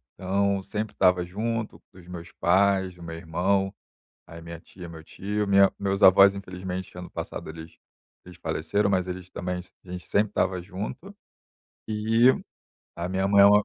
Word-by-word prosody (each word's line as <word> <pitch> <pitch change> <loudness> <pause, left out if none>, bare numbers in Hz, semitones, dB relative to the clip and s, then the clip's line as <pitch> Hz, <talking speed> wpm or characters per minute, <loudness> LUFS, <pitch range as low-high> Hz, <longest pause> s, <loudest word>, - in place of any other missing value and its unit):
então 100 +1 0
sempre 105 +2 -4
estava 90 -1 +4
junto 110 +4 -3
dos 90 -2 -15
meus 85 -1 -8
pais, 95 0 +2
do 85 - -13
meu 85 0 -6
irmão, 95 +4 0 0.6
aí 85 0 -10
minha 85 0 -8
tia, 90 +1 -11
meu 80 -1 -10
tio, 105 +5 -3
minha 100 0 +6
meus 100 0 -1
avós, 100 +1 +8
infelizmente, 90 -1 -6
ano 90 0 -8
passado - - -6
eles 80 0 -10 0.5
eles 90 -1 -13
faleceram, 80 +6 0
mas 95 -1 +1
eles 90 0 -6
também 90 0 -3
s 90 +1 -11
a 90 - -13
gente 90 -3 -7
sempre 105 0 +2
tava 95 -3 0
junto 110 - -7 0.7
e 110 +3 +3 0.7
a 85 +1 -3
minha 95 +1 0
mãe 100 0 +5
é - - +9
uma 105 0 +6
95 Hz, 170 wpm, -26 LUFS, 90-100 Hz, 0.7 s, é